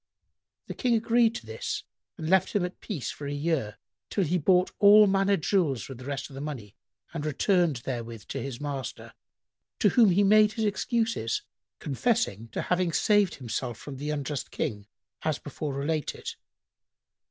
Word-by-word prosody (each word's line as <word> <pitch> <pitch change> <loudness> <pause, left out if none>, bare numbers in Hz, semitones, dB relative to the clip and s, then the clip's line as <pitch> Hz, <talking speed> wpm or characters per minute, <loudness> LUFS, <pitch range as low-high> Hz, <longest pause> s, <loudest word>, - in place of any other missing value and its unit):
The - - -6
King 245 -3 +1
agreed 230 0 +3
to - - -6
this 110 0 -4 0.3
and 160 - -5
left 190 +2 +3
him 200 -4 +2
at 180 - -8
peace 175 - -4
for 145 - -7
a - - -3
year, 145 -8 -1 0.3
till 200 - +1
he 175 +2 +1
bought 180 +3 +3
all 210 +1 +8
manner 195 0 +3
jewels 155 - 0
with 135 -3 -9
the 130 - -10
rest 140 -1 -4
of - - -15
the 135 - -7
money 125 -9 -6 0.4
and 160 -3 -4
returned 160 - +2
therewith 115 -4 -5
to - - -3
his 135 -3 -5
master, 140 -3 -5 0.6
to 205 - +4
whom 225 0 +5
he 190 +3 +4
made 210 +1 +5
his 220 - -1
excuses, 220 - 0 0.3
confessing 140 - 0
to 110 - -4
having 180 -1 +1
saved 205 +2 +3
himself 120 -1 -4
from 135 +2 -8
the 145 +3 -4
unjust 145 -2 -3
King 105 -1 -3 0.3
as 155 -3 0
before 145 +1 -5
related. 150 +2 -2
155 Hz, 170 wpm, -28 LUFS, 135-200 Hz, 0.6 s, all